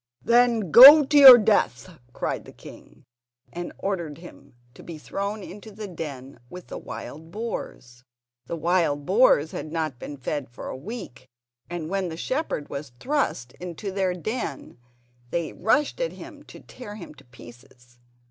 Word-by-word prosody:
"Then 235 -6 +2
go 285 +5 +11
to 295 - -2
your 270 -4 +11
death," 205 -5 0
cried - - -4
the - - -13
king; - - -16 0.5
and 175 0 -6
ordered 170 -7 -4
him 170 -6 -15 0.2
to - - -15
be 165 -2 -9
thrown 200 +6 -5
into 205 +4 -11
the 210 +1 -8
den 140 -7 -8
with 180 +4 -11
the - - -7
wild 160 +2 -9
boars. 145 - -7 0.4
The 170 - -4
wild 165 -3 0
boars 185 - +3
had 155 - -7
not 155 -6 -3
been 145 - -8
fed 135 +1 -5
for 120 - -9
a - - -6
week, 150 - -9 0.4
and 170 -2 -5
when 190 0 -2
the 160 - -8
shepherd 255 - -3
was 140 -3 -8
thrust 260 - -2
into 180 +3 -7
their 190 -2 -1
don 200 - -6 0.5
they 170 +3 -3
rushed 290 - 0
at - - -2
him - - -12
to - - -14
tear 210 -5 -11
him 180 -7 -11
to - - -19
pieces. 120 0 -17
175 Hz, 160 wpm, -24 LUFS, 145-215 Hz, 0.5 s, go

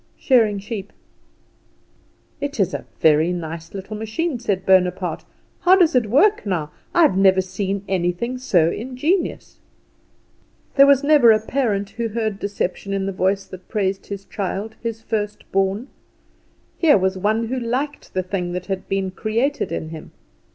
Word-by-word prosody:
"Shearing 225 -6 +3
sheep." 205 0 -6 1.5
"It 285 -3 -4
is 195 - +1
a - - -4 0.2
very 160 +2 +4
nice 165 0 -6
little 195 +2 -6
machine," 235 +7 -2
said 200 -5 -2
Bonaparte. 180 -2 +2 0.3
"How 365 +1 +6
does 355 -4 +4
it 245 -4 +2
work, 400 - +4
now? 170 -7 -2 0.2
I 345 - +4
have 295 - +4
never 190 -1 +5
seen 195 +1 -2
anything 190 +7 -1
so 175 -10 +3
ingenious!" 265 - -2 1.1
There 275 0 +7
was 280 0 +5
never 285 -6 +6
a 215 - +4
parent 215 -4 -1
who 230 +1 -3
heard 220 -2 -2
deception 200 -1 -3
in 195 -1 -1
the 195 - -2
voice 190 +1 0
that 185 -1 -12
praised 195 -2 -1
his 200 -1 -6
child 205 +2 -4
his 225 -1 -4
first 210 -2 -3
born. 195 +5 0 0.9
Here 315 -8 +6
was 190 0 0
one 215 +4 0
who 260 +1 -1
liked 255 +4 -3
the 185 - +1
thing 180 -1 -3
that 180 0 -4
had 190 -2 -4
been 195 -1 -1
created 230 +9 -1
in 155 - -4
him. 160 -1 -10
205 Hz, 160 wpm, -21 LUFS, 190-240 Hz, 1.5 s, There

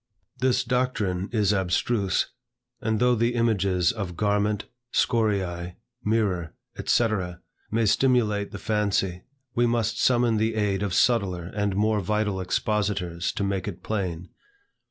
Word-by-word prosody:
This 130 0 +2
doctrine 115 -7 -1
is 105 -3 +2
abstruse, 95 +2 0 0.5
and 110 -1 0
though 125 +1 +4
the 120 +1 +1
images 100 -6 +2
of 95 -6 -5
"garment," 105 0 +1 0.3
"scoriae," 95 -7 0 0.3
"mirror," 100 -6 0 0.3
&c., 120 - +3 0.6
may 115 +1 +1
stimulate 105 -2 +2
the - - -7
fancy, 100 -4 0 0.3
we 120 0 +2
must 115 -2 0
summon 120 -3 +3
the 110 +1 0
aid 100 -3 0
of 100 -3 -1
subtler 95 -7 +1
and 105 -2 -1
more 105 +1 +2
vital 105 0 -1
expositors 95 -3 -1
to - - -2
make 100 0 -1
it 100 - -6
plain. 90 -5 -3
105 Hz, 130 wpm, -26 LUFS, 95-115 Hz, 0.6 s, though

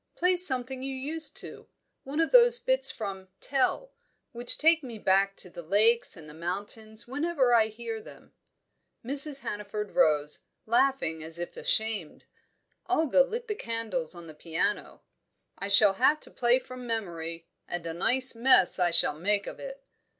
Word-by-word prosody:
Play 360 +1 +1
something 265 -7 +2
you 270 0 -5
used 310 +5 -3
to. - - -12 0.4
One 280 +4 -4
of 325 - +1
those 480 -1 +6
bits - - 0
from 195 -3 -6
'Tell,' 275 - -1 0.4
which 240 +1 +1
take 325 +1 +3
me 240 -5 -9
back 195 0 +1
to 180 - -5
the 175 - -9
lakes 215 +6 +2
and 160 -2 -13
the 150 - -12
mountains 205 +7 -5
whenever 280 -2 0
I 225 -2 +4
hear 225 0 -7
them." - - -16 0.7
Mrs. 275 +2 +6
Hannaford 210 0 -6
rose, 150 -1 +1 0.3
laughing 235 -9 0
as 160 +1 +2
if 175 0 -5
ashamed; 220 -7 -3 0.6
Olga 320 -6 +3
lit 465 - -3
the 425 - -2
candles 225 - -4
on 170 -1 -11
the 160 - -11
piano. 170 +6 -4 0.6
"I 195 - -4
shall 200 0 +6
have 275 +9 +2
to - - -11
play 240 0 +2
from 255 -1 -10
memory 170 -7 -5 0.2
and 175 -1 -6
a 165 - -4
nice 255 +9 +3
mess 240 -5 +4
I 175 -1 +2
shall 170 -3 +4
make 200 +3 0
of - - -9
it." - - -10
230 Hz, 165 wpm, -27 LUFS, 190-270 Hz, 0.7 s, those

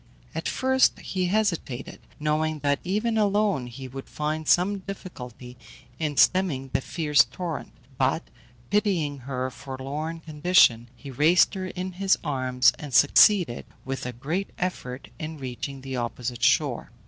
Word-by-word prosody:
At - - -3
first 260 0 +2
he 185 -2 -2
hesitated, 175 - -1 0.2
knowing 155 +1 0
that 145 0 +2
even 215 +5 0
alone 205 -9 +1
he 130 +2 -8
would 135 +1 -9
find 155 +1 -3
some 195 +3 +3
difficulty 125 - -9 0.4
in 150 -3 -2
stemming 145 -9 +3
the - - +1
fierce 150 0 +3
torrent; 175 -3 -5 0.3
but, 135 +5 +1 0.5
pitying 175 -9 +1
her 130 -1 -2
forlorn 140 +6 -5
condition, 150 -7 +3
he 125 +4 -10
raised 155 +7 +4
her 190 -2 -4
in 185 +1 -5
his 195 -1 +4
arms, 130 -4 +2
and 145 -4 -5
succeeded, 170 - +5 0.2
with 135 -1 -4
a - - -3
great 155 - -3
effort, 130 - -4
in 155 0 -5
reaching 135 +1 -6
the 135 0 -5
opposite 120 0 -4
shore. - - +2
150 Hz, 140 wpm, -26 LUFS, 130-185 Hz, 0.5 s, succeeded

